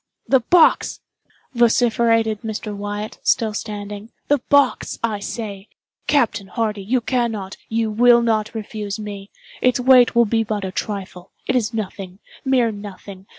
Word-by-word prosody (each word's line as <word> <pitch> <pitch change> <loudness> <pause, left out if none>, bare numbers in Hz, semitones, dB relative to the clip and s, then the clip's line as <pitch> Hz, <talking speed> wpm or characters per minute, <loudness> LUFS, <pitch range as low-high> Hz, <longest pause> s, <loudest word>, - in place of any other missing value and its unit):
"The 265 - +5
box!" 320 +8 +3 0.5
vociferated 230 -2 +2
Mr. 220 -1 -5
Wyatt, 205 +1 -5
still 220 -2 +1
standing—"the 210 +6 -4
box, 285 -2 +2
I 220 -3 -1
say! 200 -1 -6 0.4
Captain 235 -8 +1
Hardy, 215 -1 -2
you 245 +5 0
cannot, 225 -6 -2
you 225 -1 0
will 240 +2 +5
not 220 -1 0
refuse 210 -1 -5
me. 205 -1 -7 0.3
Its 250 0 +2
weight 250 -1 +5
will 235 0 +5
be 225 +1 +1
but 210 -2 -3
a 190 - -4
trifle—it 195 +4 -5
is 230 -4 +1
nothing—mere 220 +4 -2
nothing. 200 -1 -10
220 Hz, 130 wpm, -21 LUFS, 205-235 Hz, 0.5 s, The